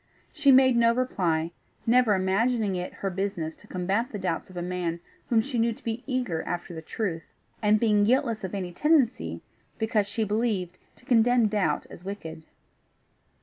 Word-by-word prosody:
She 295 -4 +4
made 260 -1 +6
no 235 0 +4
reply, 170 -10 0 0.3
never 235 -2 +4
imagining 200 +2 +1
it 180 0 -4
her 195 - -4
business 180 -4 -3
to 210 - -19
combat 195 +7 -1
the 210 - -4
doubts 185 -3 -3
of 185 - -11
a - - -2
man 175 -2 -2 0.3
whom 230 -2 +4
she 255 -2 -3
knew 230 0 +2
to - - -18
be 230 +1 -3
eager 250 - -1
after 175 0 -5
the 160 - -6
truth, 165 -2 -3 0.4
and 210 0 +4
being 210 -2 +3
guiltless 230 -1 +1
of 190 +1 -4
any 185 -3 -4
tendency, 285 - +1 0.4
because 220 -2 +1
she 220 +2 -2
believed, 205 -4 -1 0.2
to - - -24
condemn 240 0 +4
doubt 195 -8 0
as 175 - -11
wicked. 165 -5 -7
210 Hz, 175 wpm, -27 LUFS, 180-235 Hz, 0.4 s, made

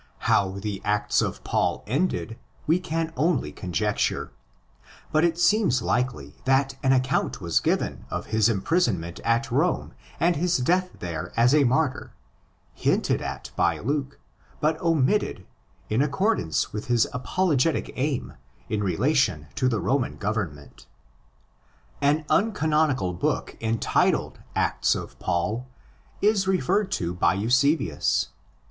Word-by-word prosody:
How 95 -1 +2
the 100 -1 -4
Acts 105 0 +1
of - - -3
Paul - - 0
ended 125 - -1 0.3
we 165 +4 +3
can 165 -2 -3
only 150 0 +1
conjecture; 95 +3 -1 0.8
but 155 +1 +3
it 170 -1 +2
seems 175 - +3
likely 75 - -1
that 135 +1 +2
an 135 -2 +3
account 130 -1 +1
was - - +1
given - - -1
of - - -4
his 110 0 +4
imprisonment 100 - 0
at 115 0 0
Rome 155 +8 0 0.3
and 175 +1 +3
his 175 +3 +1
death 180 +8 +1
there 85 -1 -5
as 120 +3 +5
a 150 -2 +5
martyr, 130 +2 0 0.6
hinted - - +1
at - - -6
by - - +2
Luke, 140 +2 -2 0.4
but 155 +1 0
omitted 165 - +1 0.4
in 110 +4 +1
accordance 145 - 0
with 105 0 -4
his 120 -2 +3
apologetic 155 +3 0
aim 135 0 -2 0.4
in 105 -1 -1
relation 100 - +1
to 130 -2 +1
the 115 -3 0
Roman 135 +2 0
government.} 95 -9 -4 1.1
An 150 +2 +2
uncanonical 155 - +1
book 90 - -2
entitled 115 0 +1 0.2
Acts - - +1
of - - -7
Paul 95 +8 -1 0.6
18 200 -2 +3
referred 190 +2 +1
to 85 -1 -1
by 90 0 +2
Eusebius. 125 - +1
130 Hz, 130 wpm, -25 LUFS, 105-160 Hz, 1.1 s, as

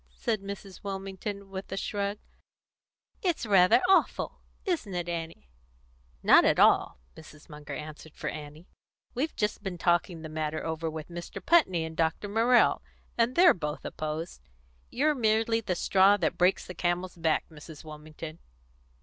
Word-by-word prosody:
said 195 - -1
Mrs. 200 -1 -9
Wilmington, 195 0 -6
with 190 0 -7
a 195 - -3
shrug. 200 +1 -2 1.0
"It's 345 -9 0
rather 200 +3 +5
awful 385 - +2 0.2
isn't 315 - -2
it, 175 -1 -2
Annie?" 165 - -6 0.7
"Not - - +7
at - - +3
all!" - - +4 0.2
Mrs. 155 -1 -14
Munger 150 -1 -8
answered 155 0 -9
for - - -6
Annie. 150 +3 -7 0.5
"We've 290 +6 -2
just 210 0 -1
been 190 -3 -5
talking 175 -1 +1
the - - -5
matter 155 0 -3
over 160 0 -2
with 155 0 -7
Mr. 175 +3 -7
Putney 190 - +3
and 160 0 -8
Dr. 160 +5 0
Morrell, 230 +4 +3 0.3
and 235 +2 +1
they're 355 0 +7
both 150 -3 -5
opposed. 155 - -5 0.5
You're 300 +4 +2
merely 225 -2 +1
the 185 -4 -2
straw 195 +3 +4
that 165 -5 0
breaks 180 +2 +2
the 180 - -8
camel's 175 +1 -2
back, 160 -2 0
Mrs. 155 0 -12
Wilmington." 155 +1 -9
180 Hz, 150 wpm, -28 LUFS, 160-205 Hz, 1.0 s, Not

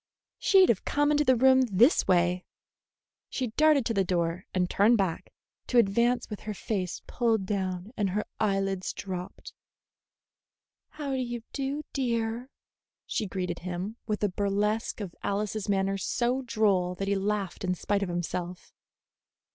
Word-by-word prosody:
She'd 380 -2 +5
have 215 - +2
come 290 +1 +1
into 295 0 +3
the 260 -3 +4
room 260 +2 +5
this 240 - +4
way." 180 0 +2 0.9
She 255 -3 -2
darted 300 +1 +4
to 230 - 0
the 195 -2 +2
door 175 0 -1
and 180 -1 +1
turned 215 +6 +4
back, 190 -5 -2 0.4
to 250 - +1
advance 235 +3 +3
with 210 - -6
her 210 -1 -6
face 190 -5 -3
pulled 225 -5 0
down 185 0 -3
and 205 -2 0
her 210 +3 -1
eyelids 195 -2 0
dropped. 185 -2 -7 1.4
"How 290 -2 -5
do 265 - 0
you 240 -2 -4
do, 280 +2 -2
dear?" 235 -1 -1 0.6
she 215 - -2
greeted 180 -2 -3
him, 180 +4 -4
with 210 -1 -2
a 205 - +3
burlesque 205 +4 -1
of 190 -4 -5
Alice's 210 +1 -2
manner 195 0 +1
so 245 +6 0
droll 205 -7 +1
that 195 +2 -3
he 200 - +2
laughed 195 -2 -2
in 180 -1 0
spite 200 +3 -1
of 195 - -2
himself. 175 +1 -4
205 Hz, 155 wpm, -28 LUFS, 185-240 Hz, 1.4 s, She'd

